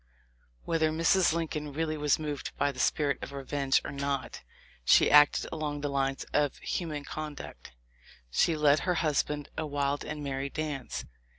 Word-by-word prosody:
Whether 160 -1 +2
Mrs. 165 +3 +3
Lincoln 155 -3 -3
really 155 +1 -1
was 150 -2 +2
moved 150 -2 -5
by 145 0 +2
the 130 - -11
spirit 145 0 +1
of - - -7
re 140 -1 -5
venge 135 -1 +1
or - - -4
not 140 -1 -3 0.4
she - - +5
acted 145 0 +6
along 150 -2 -3
the 145 - -1
lines 135 -1 -1
of 145 -2 +1
human 155 -5 -3
conduct. 150 - -7 0.6
She 160 - +2
led 150 0 +4
her 180 - 0
husband 150 -2 0
a 155 - -2
wild 145 0 -1
and 150 0 -5
merry 135 0 -3
dance. 150 -3 -4
145 Hz, 165 wpm, -29 LUFS, 140-155 Hz, 0.6 s, acted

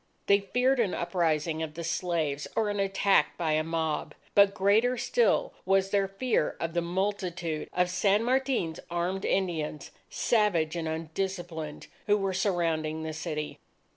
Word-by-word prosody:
They 200 0 +5
feared 250 +7 +1
an 215 -6 +1
uprising 165 -2 0
of 155 -1 -4
the 170 - -5
slaves 160 -4 -1
or 215 -2 +1
an 205 - -3
attack 195 -4 +2
by 165 -2 0
a 155 0 +2
mob. 160 -1 -2 0.2
But 200 -1 +5
greater 220 +6 +3
still - - +2
was 195 0 +2
their 200 -1 +2
fear 195 -1 0
of 165 0 -3
the 170 - +1
multitude 180 -3 -2
of 180 0 +2
San 200 +3 +2
Martin's 250 -10 0
armed 175 +3 -2
Indians, 160 -6 -1 0.2
savage 180 -9 +1
and 165 -2 -2
undisciplined, 160 -1 -4 0.2
who 205 0 +4
were 195 -2 -1
surrounding 165 -5 0
the 160 0 -4
city. 155 -1 -4
175 Hz, 150 wpm, -28 LUFS, 160-200 Hz, 0.2 s, They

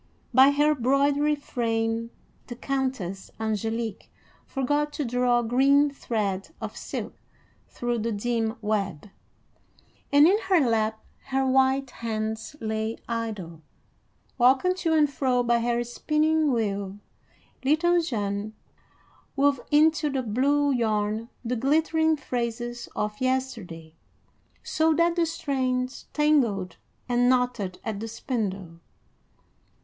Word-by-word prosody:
By 265 +1 +8
her 295 +2 +3
broidery 280 +3 +2
frame 230 -4 -2 0.4
the 240 - -6
Countess 255 -9 -3
Angélique 225 0 -3 0.4
forgot 290 +2 0
to 295 - -2
draw 245 0 +2
green 275 +5 +4
thread 210 -6 -2
of - - -6
silk - - -5 0.5
through 240 -1 -2
the 230 +2 -1
dim 225 +1 -1
web, 200 -4 -2 1.0
and 285 +1 +7
in 400 +4 +4
her 370 -3 +5
lap 220 -4 0 0.2
her 270 0 0
white 265 0 +2
hands 220 +2 -4
lay 220 0 -2
idle. 210 -8 -4 0.8
Walking 265 +9 +4
to 335 -3 0
and 305 -2 +4
fro 255 -3 0
by 235 0 +2
her 240 0 0
spinning 305 +5 +1
wheel, 200 -4 -2 0.7
little 340 +5 +3
Jeanne 210 -7 -3 0.8
wove 280 -2 +2
into 310 0 +4
the 270 -2 -2
blue 280 +6 +2
yarn 220 -2 0 0.2
the 245 +2 -1
glittering 315 +5 +2
phrases 240 -2 -4
of 210 +1 -3
yesterday, 225 -12 -3 0.7
so 320 0 +2
that 340 +1 +2
the 340 -1 +2
strands 255 -4 -2
tangled 240 - +1 0.3
and 245 0 +3
knotted 245 -7 0
at 215 -3 -4
the 225 - -5
spindle. 195 -7 -4
245 Hz, 115 wpm, -26 LUFS, 220-285 Hz, 1.0 s, By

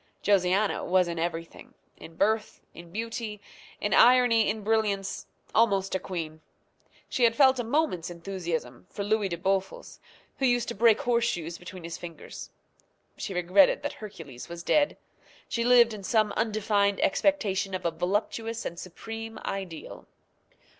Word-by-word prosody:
Josiana 195 +1 +2
was 180 0 +3
in 170 -1 -4
everything 165 0 -5 0.2
in 165 - -12
birth, 215 +4 0
in 170 +1 -12
beauty, 225 0 -4 0.4
in 205 - -1
irony, 245 -3 +6
in 215 0 -3
brilliancy 205 -3 0 0.3
almost 200 -4 +2
a 190 - +1
queen. 160 -4 -5 0.7
She 250 - -1
had 230 -1 +5
felt 265 -2 +5
a - - 0
moment's 230 - 0
enthusiasm 170 -8 -5
for 200 - -5
Louis 205 -1 +1
de 170 - -3
Bouffles, 190 +2 -2 0.4
who 265 - +3
used 245 -2 +1
to - - -3
break 225 +1 +4
horseshoes 230 -9 0
between 180 0 -10
his 165 0 -6
fingers. 170 -2 -9 0.7
She 195 - -5
regretted 180 +2 +4
that - - -3
Hercules 165 - -10
was 170 0 -7
dead. 290 - +2 0.5
She 235 - -1
lived 240 -1 +6
in 210 - -7
some 215 +1 +2
undefined 205 -2 +1
expectation 200 -7 +1
of 185 -1 -6
a 170 - +2
voluptuous 215 +6 -2
and 170 - -5
supreme 225 +5 -7
ideal. 190 -5 -6
200 Hz, 145 wpm, -27 LUFS, 175-225 Hz, 0.7 s, irony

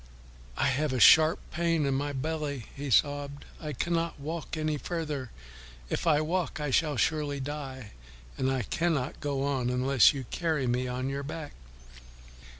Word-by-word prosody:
"I - - +2
have 135 +1 +1
a 130 - 0
sharp 155 +5 +7
pain 165 -2 +1
in 140 - +1
my 145 +2 -1
belly," 145 -2 -3
he 140 0 -5
sobbed, 145 +2 +1 0.2
"I 150 -2 -4
cannot 165 +4 -1
walk 160 +2 -5
any 155 -1 -1
farther. 150 -7 -4 0.6
If - - -1
I 150 -2 +4
walk 170 +1 -1
I 150 -2 -2
shall 150 0 +2
surely 150 0 0
die, 135 -5 -6 0.4
and 130 0 0
I 130 -2 0
cannot 155 - -1
go 140 -2 -2
on 135 -3 0
unless 130 +1 +5
you 135 -3 -5
carry 160 -6 0
me 125 +1 0
on 125 +1 -3
your 140 +1 -2
back." 150 +1 -6
145 Hz, 160 wpm, -29 LUFS, 135-155 Hz, 0.6 s, sharp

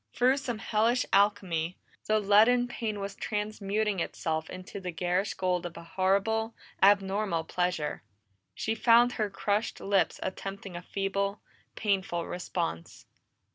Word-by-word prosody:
Through 255 +2 +4
some 245 -5 -3
hellish 220 +4 +1
alchemy, 190 -4 +2 0.3
the 215 0 +3
leaden 220 +5 +5
pain 220 -3 -3
was 200 0 -4
transmuting 210 -1 -2
itself 160 -1 -2
into 185 +2 -7
the 185 -2 -5
garish 180 +3 -1
gold 180 -1 0
of 175 -1 -7
a 170 - -8
horrible, 200 +6 0 0.3
abnormal 195 -3 +3
pleasure. 180 -3 -1 0.5
She 220 - -1
found 235 +2 +5
her 215 -3 -1
crushed 205 +2 -1
lips 195 -2 +1
attempting 195 0 -5
a 175 - -5
feeble, 200 +2 -2 0.4
painful 190 -5 0
response. 170 - -4
200 Hz, 130 wpm, -29 LUFS, 180-215 Hz, 0.5 s, leaden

